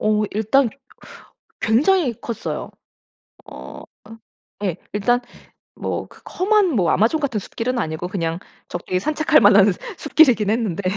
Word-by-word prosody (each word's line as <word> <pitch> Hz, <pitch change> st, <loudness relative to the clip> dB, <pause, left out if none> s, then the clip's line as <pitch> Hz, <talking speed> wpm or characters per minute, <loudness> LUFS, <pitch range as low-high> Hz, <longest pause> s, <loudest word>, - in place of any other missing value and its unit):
오 215 Hz, 0 st, +1 dB
일단 220 Hz, +4 st, +2 dB, 0.9 s
굉장히 270 Hz, -, +2 dB
컸어요. 235 Hz, -, -5 dB, 0.9 s
어 -, -, -10 dB, 0.2 s
으 225 Hz, +1 st, -12 dB, 0.5 s
예. 175 Hz, -2 st, -3 dB, 0.2 s
일단 225 Hz, +4 st, +2 dB, 0.6 s
뭐 -, -, -4 dB
그 -, -, -18 dB, 0.2 s
험한 385 Hz, -4 st, +3 dB
뭐 175 Hz, -6 st, +2 dB
아마존 230 Hz, +10 st, +2 dB
같은 250 Hz, -7 st, -1 dB
숲길은 240 Hz, +5 st, -3 dB
아니고 160 Hz, -3 st, -3 dB
그냥 165 Hz, -3 st, -2 dB, 0.3 s
적게 180 Hz, +1 st, -3 dB
산책할 310 Hz, +4 st, +2 dB
만한 200 Hz, -1 st, +6 dB, 0.2 s
숲길이긴 255 Hz, -9 st, +3 dB
했는데 210 Hz, -5 st, -1 dB
220 Hz, 250 characters per minute, -21 LUFS, 200-275 Hz, 0.9 s, 만한